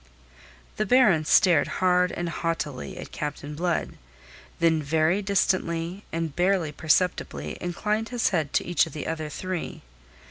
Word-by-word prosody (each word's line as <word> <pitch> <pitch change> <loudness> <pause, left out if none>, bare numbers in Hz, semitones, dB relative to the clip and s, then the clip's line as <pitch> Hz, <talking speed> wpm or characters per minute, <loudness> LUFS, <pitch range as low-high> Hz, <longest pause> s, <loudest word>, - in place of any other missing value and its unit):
The 215 - 0
Baron 195 -10 +4
stared 170 -1 +4
hard 180 -1 +3
and 175 - -3
haughtily 165 -5 -3
at - - -8
Captain 150 0 -5
Blood, 170 +2 -2 0.6
then 165 -2 +3
very 160 +6 +1
distantly 185 -2 0
and 165 -3 -3
barely 180 -3 +1
perceptibly 150 - 0
inclined 210 +5 -2
his 245 -2 +1
head 160 -6 -1
to - - +1
each 175 -2 +2
of - - -11
the 150 - -5
other 155 -1 -3
three. 185 +2 -5
170 Hz, 140 wpm, -26 LUFS, 155-185 Hz, 0.6 s, Baron